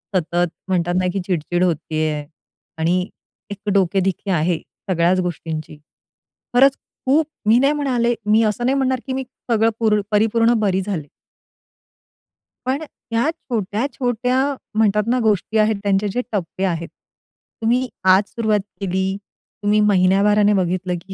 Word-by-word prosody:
सतत, 175 0 +1 0.2
म्हणतात 175 -2 0
ना, 185 - 0
की 195 - -1
चिडचिड 175 0 0
होत 175 -3 +3 0.2
आहे 155 -1 -1 0.5
आणि 180 +4 +1 0.4
एक 205 +1 -5
डोकेदुखी 195 +1 +1
आहे 170 0 +1 0.3
सगळ्याच 180 +1 +2
गोष्टींची. 160 -3 -4 0.8
खरंच 275 +2 +5 0.3
खूप 295 +4 +3 0.2
मी 225 +2 +6
नाही 280 +2 +3
म्हणाले 250 -5 +1
मी 215 +2 +4
असं 215 +3 0
नाही 265 +2 +2
म्हणणार, 260 -2 +1
की 260 - -2
मी 265 0 -2 0.3
सगळं 225 0 +4
पूर्ण 215 -2 +3
परिपूर्ण 225 +2 +3
बरी 195 -2 +1
झाले. 180 -7 -4 1.6
पण 270 +4 0
अ, - - -5 0.3
ह्या 235 +7 +2
छोट्या-छोट्या 245 - -2 0.4
म्हणतात 210 -1 +3
ना, 250 - +2
गोष्टी 215 +1 +1
आहेत, 215 0 +3
त्यांचे 200 +1 +1
जे 250 - 0
टप्पे 190 -2 -3
आहेत, 170 -2 -2 0.7
तुम्ही 245 +3 +2 0.3
आज 195 +2 +4
सुरुवात 220 -3 0 0.2
केली, 190 0 -1 0.5
तुम्ही 210 +1 +3
महिन्याभराने 205 +1 +4
बघितलं 185 -1 0
की 190 +2 -10
205 Hz, 140 wpm, -20 LUFS, 180-230 Hz, 1.6 s, मी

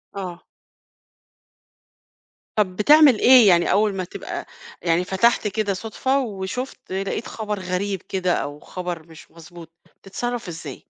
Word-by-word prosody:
آه. 180 -3 -6 2.1
طب 190 -4 +1
بتعمل 285 +3 +6
إيه 250 -3 +7
يعني 175 -2 +4
أول 210 0 +2
ما 185 - -2
تبقى 175 - -7 0.4
يعني 170 +1 +1
فتحت 215 +4 +2
كده 205 0 -1
صدفة 225 +7 -1
وشُفت 245 +2 -5
لقيت 195 +5 -3
خبر 210 -2 -4
غريب 185 +1 -3
كده 185 -2 -1
أو 145 +1 -3
خبر 175 -2 -6
مش 160 -1 -15
مضبوط، 165 0 -13 0.3
بتتصرّف 240 +4 -4
إزاي؟ 165 -2 -8
195 Hz, 125 wpm, -22 LUFS, 180-220 Hz, 2.1 s, إيه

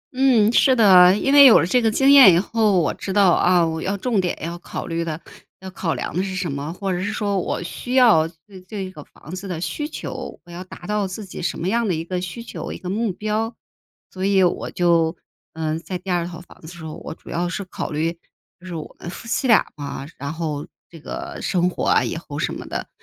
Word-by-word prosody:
嗯， 250 -5 +4
是 260 +1 +5
的。 190 -4 +7
因 275 +6 +1
为 285 0 +9
有 250 - +9
了 - - +1
这 245 +8 +2
个 225 - +3
经 270 +5 +4
验 270 -9 +10
以 - - +4
后， 210 0 +2
我 160 - 0
知 195 - -6
道 195 -2 +5
啊， 175 0 +4
我 160 0 -3
要 195 +2 -2
重 220 -1 0
点 180 -1 -2
要 170 +1 -5
考 - - -6
虑 170 -1 -2
的 160 -1 -4 0.4
要 190 0 -9
考 175 -3 -2
量 - - -5
的 180 - +1
是 190 -1 -4
什 180 -4 -2
么。 140 +3 -4
或 190 +2 -3
者 180 - -2
是 205 +3 -2
说 200 -2 -1
我 175 - -3
需 245 +8 -5
要 225 -12 +6 0.2
对 190 -3 -13
这 190 0 -6
个 155 -5 -11
房 155 - -13
子 190 +2 -7
的 175 -4 -4
需 240 - -3
求， - - -7
我 175 - -14
要 175 +2 -7
达 175 - -12
到 210 0 -1
自 195 +3 -7
己 185 - -8
什 175 - -2
么 170 - -3
样 230 +3 +1
的 180 - 0
1 160 - -3
个 180 +1 -3
需 185 +6 -6
求， - - -7
1 - - -6
个 180 - -6
目 220 +1 0
标。 215 +4 -2 0.6
所 185 - -6
以 195 -1 +3
我 175 - 0
就， 170 -1 +2 0.4
嗯， 160 0 -2
在 180 +2 -5
第 180 +1 -6
2 175 -1 0
套 170 -2 -8
房 175 - -18
子 155 - -12
的 170 - -9
时 160 - -9
候， 155 - -6
我 - - -8
主 - - -13
要 175 +1 -1
是 195 +2 -4
考 180 - -5
虑 155 +2 -1 0.5
就 185 - -12
是 175 - -6
我 155 - -8
们 - - -7
夫 210 +6 -9
妻 260 +3 0
俩 230 - +5
嘛， 140 -2 -6
然 140 +2 -4
后 155 -3 -4 0.2
这 165 - -12
个 335 - -7
生 180 -2 +1
活 - - -3
啊 - - +3
以 - - -3
后 - - -7
什 - - -1
么 - - -8
的。 - - -4
185 Hz, 265 characters per minute, -22 LUFS, 170-210 Hz, 0.6 s, 验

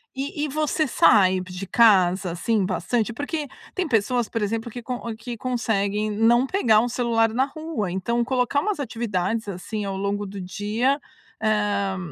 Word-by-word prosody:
E 280 +2 -3
e - - -4
você 305 +1 0
sai 190 -6 +5
de 180 +1 -7
casa, 190 -5 +4
assim, 200 +4 0
bastante? 205 +6 -1
Porque 290 +4 -3 0.3
tem 370 -3 -1
pessoas, 240 -1 +1
por 230 - -2
exemplo, 225 +3 -2
que 245 - -7
con 250 +1 -3
ou 230 -1 -4
que 235 +1 -7
conseguem 215 -4 -1
não 235 +4 +3
pegar 230 - +3
o 245 - -1
celular 235 -2 +2
na 260 +3 +2
rua. 310 - -4
Então 235 +6 0
colocar 255 +2 +1
umas 415 -2 -2
atividades, 225 -4 -2
assim, 200 +3 -4
ao 195 -1 -3
longo 200 +1 -2
do 195 0 -7
dia, 215 +9 0 0.4
hã, 205 -3 +1
225 Hz, 170 wpm, -24 LUFS, 200-250 Hz, 0.4 s, sai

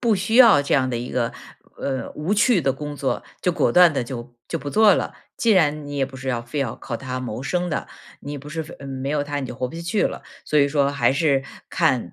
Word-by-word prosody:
不 230 -3 +3
需 200 +4 0
要 225 - +8
这 - - 0
样 130 -2 +2
的 120 - -2
一 120 +2 -5
个， 120 -2 -1 0.4
呃， 135 -2 -3
无 155 +7 -2
趣 215 -2 +4
的 135 - +2
工 145 +2 -6
作， 140 -2 -2 0.2
就 180 - +3
果 175 - +1
断 180 -2 +7
地 130 -4 -1
就， 120 -1 -7
就 - - -3
不 145 +1 -5
做 215 -3 +6
了。 - - -2 0.2
既 230 - +2
然 150 -7 +3
你 145 - -5
也 135 -1 +1
不 135 -1 -11
是 130 0 -6
要 120 -2 0
非 120 +5 -4
要 125 -5 -2
靠 120 -3 -5
它 130 0 -5
谋 125 0 -5
生 180 +4 -1
的， 150 - -3 0.3
你 145 0 -6
不 145 +2 -11
是 160 +1 -3
非 165 - -11
嗯， 140 - -9
没 135 +1 -4
有 145 -1 0
它 145 0 -3
你 130 - -4
就 - - -7
活 125 - -1
不 145 - -10
下 170 - -6
去 195 +5 0
了， - - -3 0.2
所 150 - -1
以 140 -1 +5
说 140 -1 +1
还 140 - +2
是 140 -2 +2 0.3
看， - - +1
145 Hz, 285 characters per minute, -22 LUFS, 130-170 Hz, 0.4 s, 要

